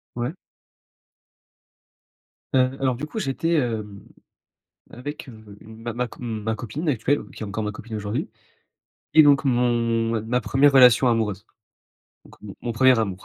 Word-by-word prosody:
Ouais. 120 +5 -2 2.2
Heu, 130 - +5 0.2
alors, 130 -2 +1
du 140 - -5
coup, 220 - -7
j'étais, 165 -1 -1
hem, 110 -6 -3 0.9
avec, 145 +4 -8
heu, 110 -4 -13
une 110 +1 -13
ma 120 0 -4
ma 125 +2 -2
co 115 - -15
ma 110 -2 -3
copine 120 +10 -6
actuelle, 140 +2 0
qui - - -12
est - - -3
encore 105 +2 -4
ma 105 - -2
copine 110 +1 -8
aujourd'hui 105 +2 -3 0.9
et 155 - +9
donc 145 -1 +4
mon 120 -2 +1
ma 115 -2 -1
ma 120 +3 -1
1re 140 +3 +3
relation 125 -1 +6
amoureuse. 105 -4 -1 0.8
Donc, - - -17
mon 100 -2 -9
mon 120 - -3
1er 130 +1 +4
amour 100 -4 -3
120 Hz, 160 wpm, -23 LUFS, 110-130 Hz, 2.2 s, et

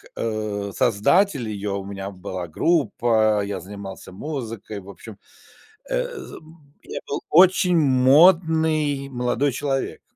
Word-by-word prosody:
э, 105 -3 -3
создатель 125 - +2
ее: 100 -1 -4
у 100 -1 -5
меня 100 0 -6
была 95 -2 -6
группа, 110 - +1
я 100 -1 -4
занимался 95 +1 -9
музыкой, 115 -3 -6
в 95 +1 -14
общем, 105 +1 -11 0.7
э, - - 0
з, - - -9
м, 155 -3 -17
я - - -6
был - - -3
очень 180 +1 +5
модный 155 +1 +3
молодой 125 +2 0
человек. 135 +1 -3
125 Hz, 125 wpm, -22 LUFS, 100-155 Hz, 0.7 s, очень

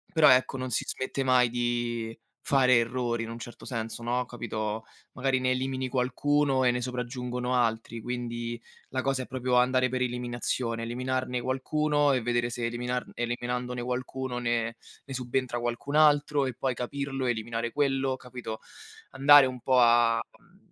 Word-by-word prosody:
Però, 150 -2 +7
ecco, 130 +1 +4
non 130 0 -4
si 115 - 0
smette 130 +1 -3
mai 125 -2 +4
di 120 -1 -2 0.2
fare 135 -4 +4
errori, 120 0 0
in 115 - -7
un 115 - -6
certo 120 +1 -10
senso, 115 -2 -4
no, 120 +2 0
capito? 110 -2 -4 0.3
Magari 130 0 +1
ne 130 0 +1
elimini 130 0 -1
qualcuno 135 +2 +1
e 125 - +5
ne 125 0 -1
sopraggiungono 125 0 -3
altri, 115 -1 0
quindi 120 0 -4 0.3
la 130 -1 -2
cosa 135 -1 0
è - - -13
proprio 125 -1 -1
andare 130 0 +3
per 130 - -2
eliminazione, 120 -1 -2
eliminarne 125 +1 -2
qualcuno 145 +2 +1
e 125 - 0
vedere 120 0 0
se 120 0 -4
eliminar 125 +1 -2
eliminandone 120 +1 -3
qualcuno 125 +1 -3
ne 115 -1 -1 0.3
ne 135 - -8
subentra 125 -1 -2
qualcun 120 +4 -3
altro 145 -2 +4
e 130 - -3
poi 130 +2 -1
capirlo, 135 +2 -3
eliminare 115 0 -2
quello, 135 -1 +1
capito? 125 -3 -7 0.5
Andare 140 +1 +7
un 130 -1 -3
po' 130 +1 +2
a, 115 -1 +5 0.2
mhmm, - - -25
125 Hz, 160 wpm, -28 LUFS, 120-130 Hz, 0.5 s, Però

